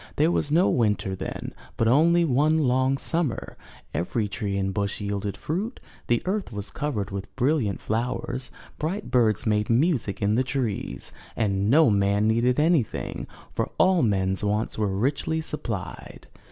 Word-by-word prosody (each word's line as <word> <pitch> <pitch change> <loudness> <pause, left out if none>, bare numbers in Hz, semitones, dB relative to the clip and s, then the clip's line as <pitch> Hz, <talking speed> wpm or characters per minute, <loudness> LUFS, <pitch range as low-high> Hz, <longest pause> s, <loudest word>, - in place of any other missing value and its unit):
There 155 +3 +3
was 145 - 0
no 170 +5 +4
winter 105 -5 +1
then, - - -5 0.2
but 115 - +2
only 170 +7 +4
one 150 +3 +3
long 130 +1 +2
summer; 160 -2 -1 0.4
every 105 +5 -1
tree 100 -2 -3
and 95 0 -1
bush 100 -1 -2
yielded 100 -1 -3
fruit; 200 - -3 0.3
the 120 -1 +1
earth 195 - -2
was 105 -2 -4
covered 110 -10 -3
with 100 0 -6
brilliant 130 -6 +1
flowers; 125 +3 -2 0.3
bright 185 +7 -3
birds 110 -4 +3
made 105 -1 +1
music 120 - +1
in 100 +1 +1
the 125 +4 +3
trees; 130 -6 -3 0.2
and 100 -2 0
no 150 -1 +6
man 100 +1 +2
needed 120 +4 +2
anything, 155 -7 0 0.3
for - - -1
all 185 -2 +4
men's 95 -4 +1
wants 105 +2 0
were 105 -1 0
richly 140 +7 0
supplied. 110 - -6
120 Hz, 155 wpm, -25 LUFS, 100-150 Hz, 0.4 s, no